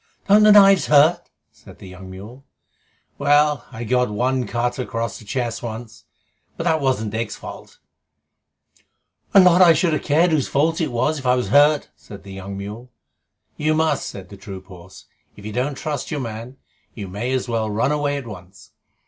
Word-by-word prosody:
"Don't 205 +1 +6
the 215 0 +7
knives 195 -2 +6
hurt?" 150 +3 +4 0.2
said - - -17
the - - -12
young 95 +1 -11
mule. 105 +8 -11 0.8
"Well, 145 -1 +2
I 115 - -7
got 125 +1 +1
one 125 +4 -1
cut 120 +1 -2
across 115 -3 -4
the 110 - -15
chest 120 +1 -3
once, 110 -9 -8 0.5
but - - -3
that 160 -1 +1
wasn't 125 -6 -1
Dick's 115 +1 -3
fault - - -11 0.8
" - - -41
"A - - +10
lot 180 -1 +6
I 170 -2 +8
should 165 0 +1
have 155 - -1
cared 165 +4 +2
whose 150 -4 +1
fault 160 +4 0
it 155 -5 -1
was, 145 +6 0
if 130 - -11
it 125 0 +2
hurt!" 145 +1 +3
said 100 - -13
the 100 -1 -11
young 95 +1 -7
mule. 105 +5 -8 0.7
"You 155 +1 +1
must," 155 -2 0
said 95 -2 -9
the 100 - -12
troop 95 -1 -10
horse. 90 -2 -14 0.3
"If 105 - -14
you 110 - -6
don't 130 +4 -2
trust 150 -4 -4
your 150 - -3
man, 115 +2 -7 0.4
you 100 -3 -7
may 105 +7 -4
as 130 -1 -1
well 115 -2 -1
run 110 +7 0
away 145 -1 -1
at 140 - -7
once. 95 -3 -12
125 Hz, 190 wpm, -21 LUFS, 105-150 Hz, 0.8 s, A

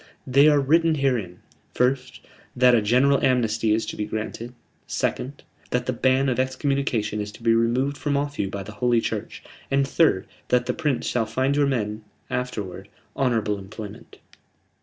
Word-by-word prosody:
"They 140 +3 +5
are 150 -1 +5
written 160 +4 +3
herein: 120 -11 -1 0.3
first, 125 0 0 0.3
that 125 0 +5
a 115 - +4
general 130 +6 +3
amnesty 115 -3 +2
is 110 +1 +1
to - - -5
be 105 - -3
granted; 110 +2 -5 0.4
second, 140 +3 -3 0.3
that 125 0 -1
the 130 - -1
ban 130 +3 +2
of 130 -1 0
excommunication 130 -5 -1
is 105 0 -5
to 115 - -14
be 115 -1 +4
removed 125 +5 +1
from 145 -2 0
off 145 0 -3
you 100 - 0
by 100 0 -5
the 105 - -9
Holy 120 +2 +2
Church; - - -4 0.3
and 135 0 +2
third, 135 - +2 0.2
that 125 0 +2
the - - -1
Prince 150 -6 -1
shall 115 -3 0
find 130 +5 0
your 145 -1 +3
men, 110 -5 -2 0.3
afterward, 100 -6 -4 0.3
honorable 110 -6 0
employment." 100 +1 -10
125 Hz, 170 wpm, -24 LUFS, 110-135 Hz, 0.4 s, They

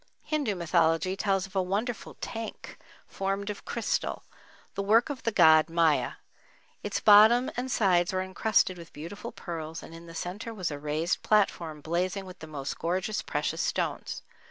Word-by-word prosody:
Hindu 290 -10 -1
mythology 170 +1 +2
tells 195 -1 0
of 195 0 -15
a 190 - +3
wonderful 210 +6 -3
tank 225 0 -6 0.3
formed 195 +1 -2
of 205 - -10
crystal, 235 -3 -2 0.5
the - - -2
work 225 +8 +3
of 270 - -6
the 230 - 0
god 160 -5 +6
Maya. 165 -2 +2 0.7
Its - - -2
bottom 220 +4 +7
and 255 +2 -3
sides 180 -5 +3
were 185 0 -1
encrusted 190 -1 +1
with 165 -1 -12
beautiful 170 +10 -7
pearls 160 -2 -6
and - - -11
in 165 +1 -11
the 165 - -11
centre 205 +7 -5
was 185 -6 -2
a 145 - -5
raised 150 +3 -1
platform 170 -7 +1
blazing 180 +5 -1
with 185 -1 -11
the 160 - -9
most 140 -3 -5
gorgeous 185 +5 -1
precious - - -2
stones. - - -2
185 Hz, 165 wpm, -28 LUFS, 165-210 Hz, 0.7 s, bottom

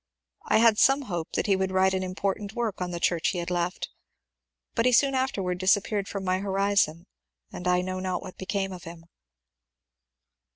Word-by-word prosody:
I - - +4
had 225 -1 +5
some 275 +1 +4
hope 175 -9 -4
that - - 0
he 200 - +3
would 190 0 0
write 190 0 +3
an 190 - 0
important 195 +2 -3
work 230 -6 -2
on 180 - -2
the 175 -1 -4
church 170 -1 +1
he 185 - -1
had 175 0 -3
left, 175 +1 -2 0.8
but 230 +1 +2
he - - +4
soon 275 +3 +4
after 260 -6 -1
disappeared 195 +2 +1
from 200 -1 -5
my 185 0 0
horizon 195 -4 +1 0.5
and 180 - -5
I 180 0 +3
know 185 0 -4
not 185 -1 -2
what 185 - -9
became 195 0 -2
of 180 -2 -9
him. 165 0 -10
190 Hz, 190 wpm, -27 LUFS, 180-205 Hz, 0.8 s, had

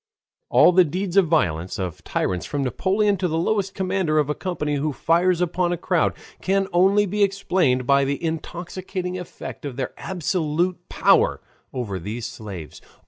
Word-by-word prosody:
All - - +6
the 185 +1 +6
deeds 180 +3 -3
of 195 -3 +5
violence 90 - 0
of 90 -4 -5
tyrants 90 -2 -2
from 145 -1 -2
Napoleon 195 - +1
to 185 0 0
the 160 -1 -1
lowest 195 +2 0
commander 185 -4 0
of 150 -1 +2
a - - +1
company 150 -5 -2
who 150 +2 -1
fires 170 +5 +2
upon 175 0 0
a 175 - -1
crowd, 175 -1 +1 0.3
can 195 +1 +1
only 195 +4 +4
be 205 +2 -2
explained 185 -10 +2
by 140 +1 +4
the 140 +4 -2
intoxicating 180 +3 -4
effect 180 - -8
of 140 -4 -5
their 130 -1 -3
absolute 175 0 -1
power - - +3 0.3
over 110 -7 -4
these 110 +6 -5
slaves. 105 - -8
170 Hz, 165 wpm, -23 LUFS, 140-185 Hz, 0.3 s, All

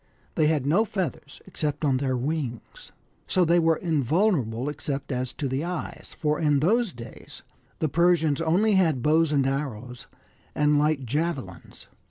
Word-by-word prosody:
They 155 - +2
had 150 -4 +1
no 170 +10 +3
feathers 185 -8 -5
except 150 0 -3
on 135 -3 +2
their 130 -1 -1
wings. 130 -3 -5 0.4
So 185 -1 +2
they 170 +1 +4
were 165 -1 +3
in 160 -3 -1
vulnerable 135 - +1
except 145 -1 -4
as 125 -1 -2
to 140 - -3
the 135 +3 -2
eyes 175 -1 -6
for 150 -1 0
in 150 -3 +2
those 215 - +2
days 115 -4 -12 0.3
the 155 - 0
Persians 165 -1 +2
only 180 +7 +2
had 160 -10 +2
bows 160 +1 +3
and 140 -3 +2
arrows, 125 -3 -4 0.5
and 150 0 +3
light 150 -3 +1
javelins. 135 - -4
150 Hz, 160 wpm, -25 LUFS, 135-165 Hz, 0.5 s, they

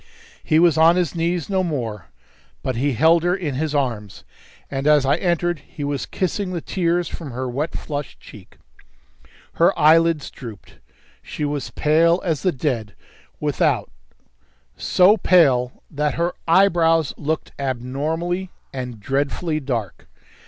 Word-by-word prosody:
He 155 - +2
was 165 -2 +4
on 165 +2 +6
his 180 -2 0
knees 170 0 -1
no 190 -2 0
more, 120 - -4 0.6
but 130 - -2
he 135 +4 0
held 160 +7 +4
her 175 +2 +1
in 165 -7 -3
his 150 +3 -2
arms, 115 -8 -2 0.5
and 135 +1 -2
as 150 -2 +5
I 140 - +3
entered 175 -2 0
he 145 +1 -9
was 140 -1 -3
kissing 185 +1 -2
the 175 - -2
tears 175 0 -1
from 160 -3 -7
her 130 +1 -4
wet, 140 +6 -3
flushed 145 -2 -6
cheek. 100 -4 -15 1.0
Her - - +4
eyelids 165 0 +4
drooped; 115 -7 -11 0.4
she 150 - -5
was 145 -2 -3
pale 165 +3 +3
as 160 -5 -1
the 185 - +2
dead 125 - -3 0.4
without, - - 0 0.8
so 190 +4 +4
pale 135 - +3
that 150 0 -1
her 170 +1 0
eyebrows 165 -3 +3
looked 155 +1 -3
abnormally 150 +8 -2 0.2
and 125 -4 -6
dreadfully 145 - -1
dark. 120 - -4
155 Hz, 140 wpm, -21 LUFS, 135-170 Hz, 1.0 s, on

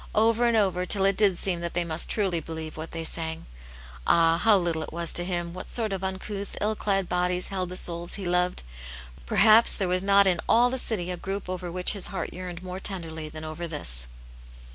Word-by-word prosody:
oyer 230 +2 +3
and 235 -1 +3
over, 190 -4 +1
till 195 +1 +1
it 195 0 +3
did 195 -3 +3
seem 180 -2 0
that 170 0 -5
they 175 - +1
must 165 -1 +1
truly 190 -6 +1
believe 160 0 -7
what 160 +1 -6
they 165 0 -5
sang. 160 0 -2 0.6
Ah, 165 0 +4
how 215 +1 +5
little 170 -3 -1
it - - -6
was' 170 0 0
to 175 - -1
Him 175 -1 -3
what 185 - -7
sort 220 -4 -2
of 190 0 -4
uncouth, 195 +1 -5
ill 215 +1 0
clad 195 -3 0
bodies 180 0 0
held 185 -2 -3
the 180 - -5
souls 170 -1 -1
He 200 - -5
loved 180 +1 +1
t - - -3 0.6
Perhaps 220 - +6
there 195 - -1
was 180 0 +1
not 200 +1 +5
in 180 -3 +3
alf 245 +2 +5
the 260 - -2
city 185 -7 -3
a 180 - -4
group 195 +2 -4
over 180 -1 -5
which 180 +1 +4
His 200 -3 -3
heart 195 - -5
yearned 180 -1 -7
more 185 0 -6
tenderly 165 -5 -5
than 155 0 -8
over 155 +2 -5
this. - - -2
180 Hz, 225 wpm, -26 LUFS, 170-195 Hz, 0.6 s, Perhaps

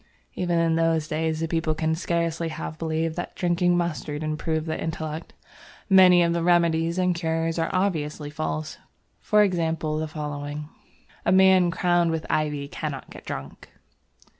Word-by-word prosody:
Even 175 -2 0
in 165 -1 +2
those 165 -2 +1
days 160 0 -1
the 165 - 0
people 165 -1 0
can 160 +1 0
scarcely 170 0 -1
have 155 0 -6
believed 160 0 -1
that 175 - -5
drinking 175 0 +2
mustard 155 -3 -2
improved 155 +1 -2
the 160 - -3
intellect. 160 0 -5 0.6
Many 180 -2 +7
of 170 0 +1
the 170 - 0
remedies 170 -1 +2
and 180 -1 +2
cures 165 -1 -1
are 165 - 0
obviously 155 -6 -1
false, 155 0 -4 0.4
for 210 0 +4
example 165 -5 0
the 160 - -2
following: 150 -1 -5 0.5
"A - - +2
man 190 -1 +6
crowned 175 -1 +2
with 160 -1 -2
Ivy 150 -2 -1
cannot 145 -1 -6
get - - -12
drunk." 70 - -7
165 Hz, 155 wpm, -25 LUFS, 155-175 Hz, 0.6 s, Many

